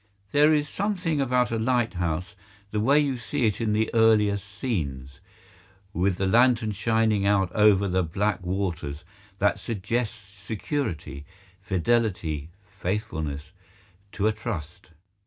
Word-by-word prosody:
There 150 +2 +5
is 150 -1 +2
something 180 -4 -1
about 125 -2 +1
a 115 - 0
lighthouse—the 100 -2 -2
way 140 +7 +4
you 140 -3 0
see 130 +2 -1
it 110 +1 0
in 110 -2 +1
the 110 +1 0
earlier 110 -3 +4
scenes—with 95 - -5
the 95 - 0
lantern 115 +1 +4
shining 110 -1 +1
out 95 -3 +2
over 105 -1 +4
the 95 0 +1
black 95 +6 -1
waters 90 -5 -3 0.3
that 100 +1 +2
suggests 115 +2 -2 0.3
security, 100 - -3 0.4
fidelity, 90 -6 0 0.3
faithfulness, 80 -7 -3 0.6
to 105 - -1
a 110 - +4
trust. 95 - -6
105 Hz, 120 wpm, -26 LUFS, 90-115 Hz, 0.6 s, There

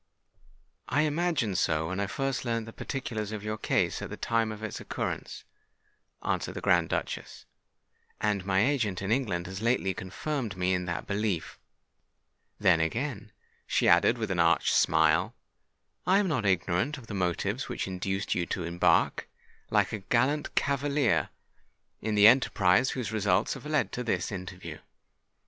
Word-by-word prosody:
"I 145 +3 +2
imagined 150 - 0
so 80 0 +1
when 95 +1 -3
I 100 - 0
first 135 +4 -2
learnt 115 -2 -1
the 115 - -10
particulars 110 -6 -4
of 105 -2 -5
your 105 0 -3
case - - 0
at - - -5
the - - -7
time 115 -1 0
of 110 0 -8
its 110 - -4
occurrence," - - -4 0.8
answered - - -2
the - - -3
Grand 85 -4 +3
Duchess; - - -4 0.7
"and 105 -3 0
my 95 +2 +2
agent 115 -10 0
in 95 - -2
England 105 -9 0
has 95 +1 -6
lately 115 -5 +1
confirmed 110 +3 -4
me 90 0 +1
in 90 -1 -1
that 85 -1 -3
belief. 100 -4 -2 1.0
Then, 90 -5 +4
again," 105 - -2 0.4
she - - +2
added, - - +5
with - - -3
an - - -1
arch - - +3
smile, - - +3 0.7
"I 190 +2 +5
am 205 -1 +2
not 130 - 0
ignorant 95 - +1
of 130 - -11
the 115 - -8
motives 100 +6 -1
which - - -3
induced 95 +1 -2
you 85 -2 -1
to 90 - -3
embark, 85 +1 +2 0.4
like - - +2
a 110 - -2
gallant 130 +9 0
cavalier, 140 - +1 0.7
in 110 0 -1
the 105 0 +6
enterprise 115 -2 +5
whose 120 -4 -3
results 105 -2 +1
have - - -8
led 150 0 +1
to 125 - -3
this 95 -6 -1
interview." 95 -2 -7
105 Hz, 160 wpm, -29 LUFS, 95-125 Hz, 1.0 s, the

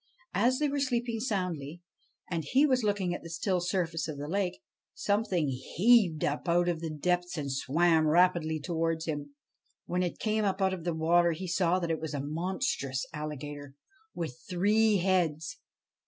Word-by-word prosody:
As 255 +2 +3
they 300 - +1
were 285 0 -1
sleeping 240 -4 -1
soundly, 175 - -3 0.4
and 165 -2 -2
he 270 - +3
was 260 -3 +2
looking 200 -4 0
at - - -5
the 170 - -9
still 180 +2 -1
surface 175 -3 -1
of 155 -3 -5
the 145 +1 -5
lake, 185 -1 -1 0.4
something 200 -7 0
heaved 170 - +3
up 150 +4 -1
out 175 +1 +3
of 170 -2 0
the 165 0 -4
depths 175 +3 -1
and 140 -2 -3
swam 160 +4 +2
rapidly 160 -1 +3
towards 165 0 -1
him. 145 -2 -4 0.5
When 180 +1 -1
it 175 -2 -2
came 215 0 0
up 195 -1 0
out 190 -1 +2
of 175 -3 -6
the 170 -2 -1
water 170 +2 +3
he 185 +4 -6
saw 175 0 +2
that 170 -3 -1
it 160 - -2
was 155 -2 -4
a - - -2
monstrous 155 - -2
alligator, 145 -2 -6 0.4
with 130 -7 -5
three 210 +4 +3
heads. 165 -6 0
175 Hz, 175 wpm, -30 LUFS, 155-190 Hz, 0.5 s, As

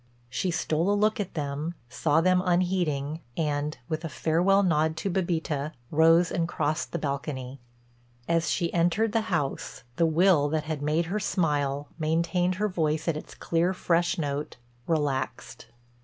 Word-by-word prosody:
She 180 +9 -1
stole 165 +1 0
a 205 - +3
look 215 +1 +2
at 200 -4 -4
them, 150 +2 -3
saw 150 +5 +1
them 185 +1 +3
unheeding 175 -5 0 0.2
and, 150 -2 -1
with 155 +1 -3
a 165 - -3
farewell 175 +7 +2
nod 160 -2 +2
to 195 - -2
Bébita, 165 -5 -1 0.2
rose 165 +2 +5
and 165 -1 0
crossed 155 -2 -1
the - - -1
balcony. 140 -3 -4 0.7
As 165 -2 +1
she 170 -2 0
entered 175 +6 +2
the 225 0 +2
house, 145 -7 -2
the 165 - +4
will 160 -2 +4
that 155 0 0
had 155 -2 -4
made 155 +3 +1
her 195 +6 -2
smile, 145 -6 0
maintained 170 +3 +1
her 210 +3 0
voice 160 -4 -1
at 165 - +1
its 155 - -8
clear, 170 +3 0
fresh 170 -1 +1
note, 145 -2 -3 0.3
relaxed. 145 -5 -2
165 Hz, 155 wpm, -27 LUFS, 150-175 Hz, 0.7 s, rose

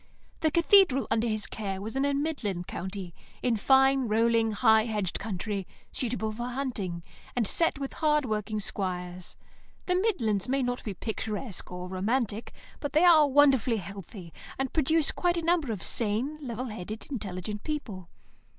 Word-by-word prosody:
The 315 - +2
Cathedral 335 -4 +5
under 225 +1 +2
his 215 -2 0
care 195 -2 -4
was 220 +4 -6
in 270 +1 +1
a 285 - +1
midland 255 - -2
county, 190 -1 -6 0.3
in 245 -2 +2
fine, 265 +3 +4
rolling, 225 +1 +3
high 220 +1 +4
hedged 210 -6 -2
country, 200 -1 -3 0.2
suitable 225 -3 -1
for 240 +3 -4
hunting, 230 -10 -3 0.3
and 240 -3 +1
set 330 +4 +1
with 275 -1 -5
hard 300 -2 +2
working 215 -1 -2
squires. 180 -3 -4 0.5
The 360 - +1
midlands 255 - +1
may 270 0 +1
not 245 0 -2
be 205 -3 -4
picturesque 215 0 -4
or 180 0 -5
romantic, 215 +4 -1 0.3
but 290 -2 -4
they 315 +4 +5
are 315 -4 +7
wonderfully 265 -4 +4
healthy, 195 -2 -8 0.2
and 270 -1 -2
produce 315 0 +3
quite 350 -1 0
a 335 - -2
number 330 -7 +2
of 200 -5 -4
sane, 235 +7 0
level 250 -2 -4
headed, 215 -1 -6
intelligent 205 -3 -5
people. 210 - -5
225 Hz, 160 wpm, -28 LUFS, 200-275 Hz, 0.5 s, are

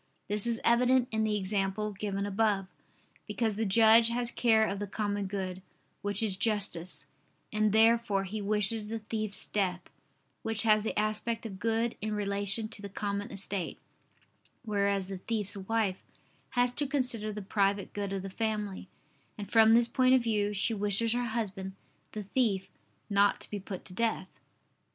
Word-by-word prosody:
This 210 +2 -1
is 235 -1 0
evident 250 +1 +4
in 220 0 0
the 215 -1 +1
example 200 +1 -1
given 200 0 -3
above: 205 -1 +1 0.6
because 225 -3 -1
the 220 +1 -1
judge 225 +3 +6
has 240 0 +1
care 220 -3 +4
of 195 -1 -3
the 205 - -3
common 205 -1 -2
good, 190 -1 -4 0.4
which 205 +1 +1
is 205 -4 +2
justice, 195 -4 -1 0.5
and 215 0 +2
therefore 225 -2 +4
he 210 +3 -5
wishes 210 +1 0
the 225 +1 -3
thief's 215 -1 -4
death, 185 -3 -2 0.5
which 225 0 0
has 215 -1 +4
the 220 - -3
aspect 215 +2 -1
of 195 -4 -7
good 225 +1 0
in 215 +1 -2
relation 200 +1 0
to 215 - -6
the 200 - -6
common 200 +1 -3
estate; 195 -2 -3 0.9
whereas 200 -2 0
the 190 -1 -6
thief's 210 0 -3
wife 200 -1 -1 0.5
has 245 0 +4
to 290 +3 -1
consider 250 -6 -1
the 210 -1 -6
private 200 0 0
good 200 -1 -3
of 195 -1 -3
the 195 - -5
family, 210 -3 -3 0.5
and 205 -1 -7
from 225 0 +7
this 235 0 +5
point 255 +2 +4
of 255 - +2
view 210 -3 +1
she 210 +3 +1
wishes 210 +2 +2
her 245 0 0
husband, 195 -5 -3 0.4
the 215 - -4
thief, 200 -3 0 0.4
not 200 -1 +3
to - - -4
be 205 - -3
put 190 -1 -7
to 185 - -7
death. 220 -2 -1
210 Hz, 170 wpm, -30 LUFS, 200-225 Hz, 0.9 s, from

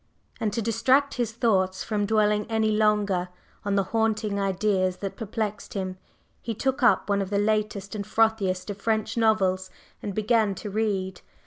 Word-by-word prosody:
And 215 - 0
to 230 - -1
distract 265 +5 +2
his 240 -3 -1
thoughts 190 -5 +1
from 205 -2 -1
dwelling 210 -1 +2
any 220 -1 +1
longer 210 -4 +2 0.3
on 200 -1 0
the 195 - +3
haunting 220 -2 +1
ideas 190 -1 +1
that 195 -1 -5
perplexed 215 -2 -4
him, 185 -1 -3 0.4
he 230 -1 -4
took 265 +5 -1
up 245 - +4
one 200 -1 +1
of 190 - -3
the 200 - 0
latest 210 -2 0
and 210 -2 -3
frothiest 210 -3 +1
of 200 0 -9
French 220 -1 0
novels 190 -5 +2 0.3
and 200 -2 -5
began 215 -2 +2
to 205 +2 -6
read. 195 -3 -1
210 Hz, 165 wpm, -26 LUFS, 195-220 Hz, 0.4 s, up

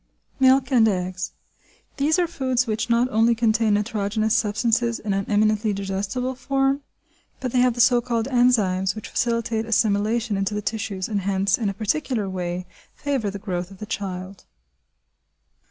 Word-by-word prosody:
Milk 260 0 +4
and 235 -4 +5
Eggs. 185 -2 -2 0.6
These 295 +4 +2
are 355 - +3
foods 260 -6 0
which 225 0 -2
not 235 +1 +3
only 225 +2 +3
contain 220 -2 +2
nitrogenous 215 0 0
substances 235 +1 +1
in 205 -2 -3
an 195 0 -2
eminently 215 0 +2
digestible 200 +6 -3
form, 270 +1 0 0.6
but 255 -2 -3
they 250 - +2
have 250 -1 +3
the 240 - +2
so 245 0 +5
called 235 -1 -1
enzymes 215 -8 +2
which 215 - -7
facilitate 230 -1 -1
assimilation 220 0 +1
into 195 +2 -1
the 210 - -2
tissues, 205 -4 -3
and, 205 -3 -1
hence, 195 0 +1
in 220 -4 -1
a 195 - -5
particular 225 0 -1
way, 180 -1 -4 0.3
favour 270 -7 -1
the 200 - -5
growth 180 -3 -4
of 195 - -13
the 215 - -7
child. 190 -2 -6
220 Hz, 160 wpm, -23 LUFS, 200-245 Hz, 0.6 s, and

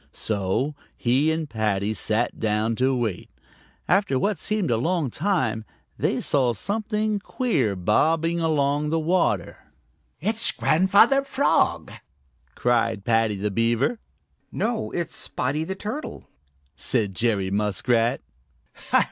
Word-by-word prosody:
So 105 +7 -1 0.2
he 135 +6 +2
and 160 -1 -2
Paddy 110 -4 -1
sat 110 +3 -1
down 110 +1 0
to 130 +1 +2
wait. 110 -8 -3 0.6
After 195 -10 +2
what 200 +4 0
seemed 210 - -1
a 115 - +2
long 160 +1 0
time, 130 - 0 0.3
they - - 0
saw 130 -4 +1
something 210 - -1
queer 175 - 0
bobbing 160 - +1
along 150 -2 +1
in - - -2
the 165 +1 +1
water. 170 +3 0 0.6
"It's 220 +6 0
Grandfather 200 - +4
Frog," 275 0 +1 0.6
cried 115 -4 +1
Paddy 115 -2 +2
the 100 +1 -2
Beaver. 115 - +1 0.5
"No, 225 0 -1
it's 170 -1 -3
Spotty 135 +5 -2
the 190 +4 -4
Turtle," 215 +10 -6 0.5
said 105 -6 0
Jerry 100 -3 0
Muskrat. 115 +4 +1
135 Hz, 120 wpm, -24 LUFS, 110-185 Hz, 0.6 s, Grandfather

